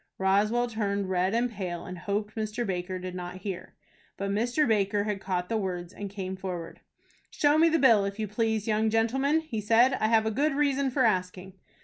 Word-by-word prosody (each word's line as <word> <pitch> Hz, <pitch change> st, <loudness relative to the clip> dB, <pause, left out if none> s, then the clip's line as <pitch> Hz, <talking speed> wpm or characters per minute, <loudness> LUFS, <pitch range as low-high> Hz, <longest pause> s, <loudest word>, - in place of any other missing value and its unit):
Roswell 205 Hz, +5 st, +2 dB
turned 200 Hz, -4 st, -2 dB
red 185 Hz, +3 st, +1 dB
and 240 Hz, +1 st, +1 dB
pale, 180 Hz, -5 st, -5 dB
and 180 Hz, -, -7 dB
hoped 205 Hz, +3 st, -3 dB
Mr. 220 Hz, +2 st, -3 dB
Baker 185 Hz, -1 st, -3 dB
did 185 Hz, 0 st, -6 dB
not 180 Hz, 0 st, -7 dB
hear. 195 Hz, -4 st, -6 dB, 0.4 s
But 200 Hz, 0 st, -2 dB
Mr. 245 Hz, +8 st, +1 dB
Baker 205 Hz, -2 st, +1 dB
had 205 Hz, -2 st, -3 dB
caught 180 Hz, -2 st, -2 dB
the 225 Hz, -, -1 dB
words, 180 Hz, -3 st, -4 dB
and 200 Hz, -1 st, -6 dB
came 190 Hz, -1 st, -5 dB
forward. 180 Hz, -3 st, -6 dB, 0.5 s
"Show 295 Hz, +1 st, +2 dB
me 330 Hz, +1 st, +6 dB
the 325 Hz, -, +2 dB
bill, 230 Hz, -8 st, +5 dB
if 200 Hz, +1 st, -4 dB
you 215 Hz, -1 st, -2 dB
please, 220 Hz, 0 st, -1 dB
young 220 Hz, 0 st, +2 dB
gentleman," 265 Hz, +8 st, +2 dB
he 240 Hz, -9 st, -4 dB
said. 230 Hz, +5 st, +4 dB
"I 215 Hz, -, +2 dB
have 220 Hz, -1 st, +3 dB
a 220 Hz, -, 0 dB
good 280 Hz, +5 st, +1 dB
reason 280 Hz, -2 st, +1 dB
for 260 Hz, 0 st, +2 dB
asking." 185 Hz, -2 st, -1 dB
210 Hz, 205 wpm, -28 LUFS, 190-230 Hz, 0.5 s, me